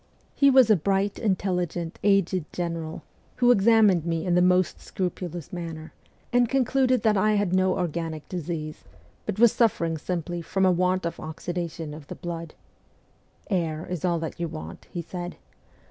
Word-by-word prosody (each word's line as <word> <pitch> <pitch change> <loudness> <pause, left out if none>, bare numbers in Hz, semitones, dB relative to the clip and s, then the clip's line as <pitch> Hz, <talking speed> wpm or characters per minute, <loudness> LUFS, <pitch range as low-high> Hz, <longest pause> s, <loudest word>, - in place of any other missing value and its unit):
He 280 - +5
was 260 -4 +6
a - - +7
bright, 195 +3 +1
intelli 190 -4 0
gent, 170 0 -6
aged 195 -4 +2
general, 165 -2 -4 0.3
who 245 -1 +4
examined 210 -5 +5
me 165 0 -2
in 180 - +1
the 180 - +4
most 180 0 +2
scrupulous 175 -3 -4
manner, 165 -2 -6 0.4
and 245 -1 +4
concluded 255 -2 +2
that 215 -2 +3
I 215 +2 +3
had 205 -3 +1
no 185 0 +2
organic 165 -2 -3
disease, 165 -3 -5 0.4
but 210 - -2
was 235 0 +6
suffering 170 -9 +1
simply 175 +1 -3
from 190 +3 0
a 185 - +5
want 180 +1 +1
of 170 - -3
oxidation 165 -1 -5
of 150 -2 -10
the - - -7
blood. 170 -2 -6 0.5
' - - -38
Air 165 -3 -1
is 180 -4 -4
all 175 -2 +2
that 160 0 -5
you 170 - -1
want,' 80 - -9
he 175 - -5
said. 175 +1 -6
180 Hz, 170 wpm, -26 LUFS, 165-195 Hz, 0.5 s, a